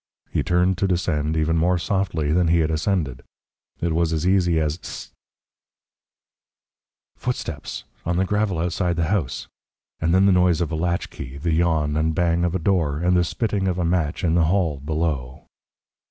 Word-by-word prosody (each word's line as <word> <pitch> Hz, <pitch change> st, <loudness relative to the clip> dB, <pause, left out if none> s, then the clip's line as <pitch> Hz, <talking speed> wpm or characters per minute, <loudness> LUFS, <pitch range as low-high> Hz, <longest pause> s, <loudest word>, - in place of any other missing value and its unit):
He -, -, 0 dB
turned 90 Hz, +1 st, +1 dB
to 100 Hz, -, +2 dB
descend 80 Hz, -4 st, 0 dB
even 80 Hz, +1 st, +1 dB
more 90 Hz, +3 st, +2 dB
softly 85 Hz, -4 st, -1 dB
than 85 Hz, +2 st, +3 dB
he 85 Hz, 0 st, +3 dB
had 80 Hz, 0 st, 0 dB
ascended. 80 Hz, -6 st, -1 dB, 0.6 s
It 85 Hz, -1 st, 0 dB
was 85 Hz, 0 st, +1 dB
as 80 Hz, +1 st, -1 dB
easy 90 Hz, -4 st, +3 dB
as 75 Hz, 0 st, -1 dB
Hist!... -, -, -8 dB, 2.1 s
Footsteps! 85 Hz, -, -4 dB, 0.2 s
On 85 Hz, +1 st, -1 dB
the 95 Hz, -, +2 dB
gravel 105 Hz, -2 st, 0 dB
outside 85 Hz, +1 st, 0 dB
the 80 Hz, -1 st, 0 dB
house 75 Hz, -11 st, -2 dB, 0.5 s
and 80 Hz, +1 st, 0 dB
then 95 Hz, +2 st, +4 dB
the 100 Hz, -, +5 dB
noise 90 Hz, -2 st, +3 dB
of 85 Hz, -2 st, -1 dB
a -, -, -1 dB
latchkey, 80 Hz, -5 st, -3 dB
the 80 Hz, +3 st, -1 dB
yawn 80 Hz, -3 st, +1 dB
and 80 Hz, +1 st, +1 dB
bang 85 Hz, 0 st, +2 dB
of 90 Hz, 0 st, 0 dB
a -, -, +1 dB
door, 80 Hz, -5 st, +1 dB
and 90 Hz, +3 st, +2 dB
the 90 Hz, -, +4 dB
spitting 100 Hz, +3 st, -1 dB
of 90 Hz, -1 st, 0 dB
a 90 Hz, -, 0 dB
match 85 Hz, -3 st, 0 dB
in 85 Hz, -2 st, +2 dB
the 85 Hz, -1 st, +4 dB
hall 85 Hz, -5 st, +1 dB
below. 75 Hz, -4 st, -3 dB
85 Hz, 180 wpm, -23 LUFS, 80-90 Hz, 2.1 s, the